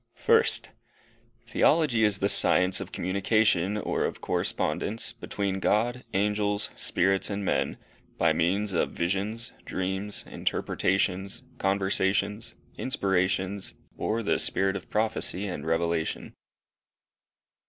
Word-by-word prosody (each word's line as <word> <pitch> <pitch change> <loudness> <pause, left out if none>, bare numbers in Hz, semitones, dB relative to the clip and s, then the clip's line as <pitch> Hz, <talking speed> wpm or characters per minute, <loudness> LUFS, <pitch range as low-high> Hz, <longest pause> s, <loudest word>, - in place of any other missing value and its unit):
First. 460 0 +3 0.8
THEOLOGY 130 -9 +3
is 105 -2 +3
the 100 - 0
science 90 -2 +6
of - - -8
communication, 100 +1 +1
or 105 - -2
of - - -3
correspondence, 110 +2 -1
between 100 -4 -3
God, 120 +6 0
angels, 105 +1 0
spirits, 95 +2 +1
and 100 -1 -3
men, - - -1 0.4
by 85 -1 +3
means 95 +5 0
of 85 - 0
visions, 100 +6 -2
dreams, 95 +2 -4
interpretations, 95 +2 -1 0.2
conversations, 100 +2 0 0.2
inspirations, 95 -4 -1 0.2
or 115 +1 -2
the - - +1
spirit 95 0 +2
of - - -7
prophecy 105 -3 -1
and 90 -6 -5
revelation. 80 0 -1
100 Hz, 105 wpm, -27 LUFS, 95-105 Hz, 0.8 s, science